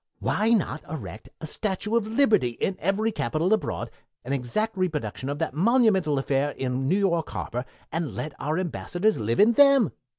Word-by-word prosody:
Why 215 +2 0
not 200 -9 +1
erect 125 -8 -7
a - - -4
Statue 205 +6 -2
of 225 -2 +1
Liberty 220 - +3
in 190 - 0
every 205 +5 0
capital 175 -2 0
abroad, 220 - -2 0.3
an 135 - -2
exact 140 - -1
reproduction 150 - -2
of 145 - -3
that 160 -3 -2
monumental 190 - +3
affair 135 +1 0
in 130 +1 -1
New 190 - +3
York 170 -5 +1
Harbor, 125 +1 -4 0.3
and 165 -2 -3
let 150 -1 -4
our 155 +3 -1
Ambassadors 185 +3 -1
live 115 +2 -1
in 220 +3 +6
them? 275 - +5
175 Hz, 170 wpm, -25 LUFS, 140-215 Hz, 0.3 s, in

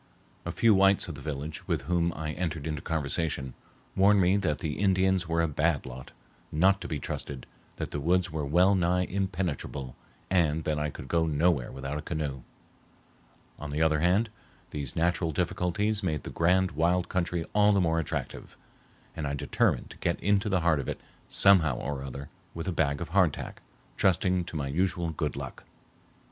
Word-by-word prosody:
A - - -1
few 110 +5 +4
whites 95 0 +4
of 85 - -5
the 70 - -10
village, 75 +2 -5
with - - -1
whom 85 +2 +1
I 75 0 -3
entered 80 -3 -3
into 75 -3 -3
conversation, 75 -3 -2 0.4
warned 100 +1 +5
me 90 +1 +4
that 80 -7 0
the 75 0 -4
Indians 95 -2 +2
were 85 0 +1
a - - +2
bad 75 0 0
lot, 65 0 -9 0.4
not 95 +5 +3
to - - -5
be 80 - -2
trusted, 70 -1 -5 0.3
that - - -5
the 75 - -2
woods 90 +4 +1
were 80 -1 -2
well 90 +7 +4
nigh 90 -1 +2
impenetrable, 90 -9 -3 0.3
and 80 -4 +2
that 75 -1 -1
I 75 0 -1
could 65 - -9
go 80 +1 +1
nowhere 75 -3 +1
without 70 +2 -4
a - - -5
canoe. 75 -5 -3 1.2
On 75 - -6
the 75 +2 0
other 80 -1 +3
hand, 95 +7 +2 0.4
these 70 -3 -4
natural 85 0 +1
difficulties 100 +7 0
made 80 -6 -2
the - - -6
grand 90 +2 +2
wild 85 +4 +1
country 85 -2 -1
all 105 0 +5
the 100 - +3
more 80 -2 +2
attractive, 80 - -5 0.6
and 75 -3 -3
I 70 - -2
determined - - 0
to - - -12
get 85 - -1
into 100 +2 +2
the 95 -3 +2
heart 80 -3 +3
of 70 - -4
it - - -4 0.3
somehow 85 -9 +5
or 70 0 -4
other 70 +1 -7 0.3
with 85 +2 -5
a - - +1
bag 70 -4 0
of - - -4
hardtack, - - +1 0.4
trusting 90 -1 +2
to - - -7
my 70 -3 -2
usual 85 +3 0
good 80 - -2
luck. - - -7
85 Hz, 185 wpm, -28 LUFS, 75-90 Hz, 1.2 s, warned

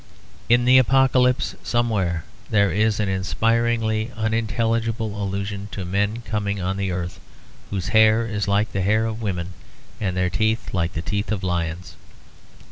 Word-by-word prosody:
In 120 +1 +4
the 130 +1 +7
Apocalypse 130 0 +3
somewhere 100 -9 0 0.3
there 100 -2 +3
is 105 +1 +1
an 105 - +1
inspiringly 115 +3 0
unintelligible 115 0 -1
allusion 100 0 -3
to 95 - -4
men 100 +5 -1
coming 100 -2 -2
on 95 +1 -1
the 100 -1 -1
earth, 90 0 -4 0.5
whose 95 -2 -3
hair 110 +1 +5
is 105 -3 -2
like 100 +2 +1
the 100 - -1
hair 105 +4 +2
of 110 0 -4
women 90 -4 -3 0.5
and 95 -3 -2
their 90 -1 +1
teeth 110 +3 0
like 90 -1 0
the 80 - -4
teeth 100 +5 -2
of 105 -2 -2
lions. 85 -1 -3
105 Hz, 150 wpm, -23 LUFS, 95-115 Hz, 0.5 s, the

